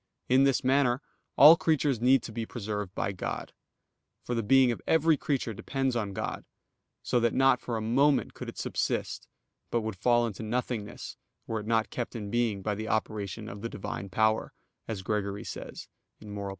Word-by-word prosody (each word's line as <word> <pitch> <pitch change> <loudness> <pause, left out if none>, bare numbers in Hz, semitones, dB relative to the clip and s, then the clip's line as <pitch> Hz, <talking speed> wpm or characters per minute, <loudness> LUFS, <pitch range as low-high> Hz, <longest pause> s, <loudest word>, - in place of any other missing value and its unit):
In 130 +2 +5
this 135 -2 +2
manner 130 -1 +3 0.4
all 150 +4 +10
creatures 150 -7 +1
need 130 0 +4
to - - -7
be 115 +1 -3
preserved 105 -4 -5
by - - -1
God. 95 - -5 0.7
For 120 - -3
the 115 - 0
being 130 +3 +5
of 115 - -5
every 160 0 +4
creature 135 -5 -2
depends 135 +4 -2
on 105 -4 -2
God, - - -4 0.6
so 120 - +1
that 120 -1 +1
not 135 -1 +4
for 120 -2 -3
a - - -3
moment 135 +6 +2
could - - -7
it - - -10
subsist, - - -2 0.4
but 120 - 0
would 110 -2 -4
fall 120 +4 +3
into 110 -3 -5
nothingness 115 -1 -4 0.3
were 110 - -2
it 105 - -8
not 115 -1 +1
kept 120 0 -4
in 105 -3 -5
being 115 -5 0
by 105 - 0
the 110 +2 -5
operation 110 -1 -2
of 100 0 -8
the 115 - -3
Divine 100 -1 -6
power, 110 +2 +1 0.3
as 105 -4 -4
Gregory 100 0 -2
says - - -8 0.3
(Moral. 100 -2 -6
115 Hz, 185 wpm, -29 LUFS, 105-125 Hz, 0.7 s, all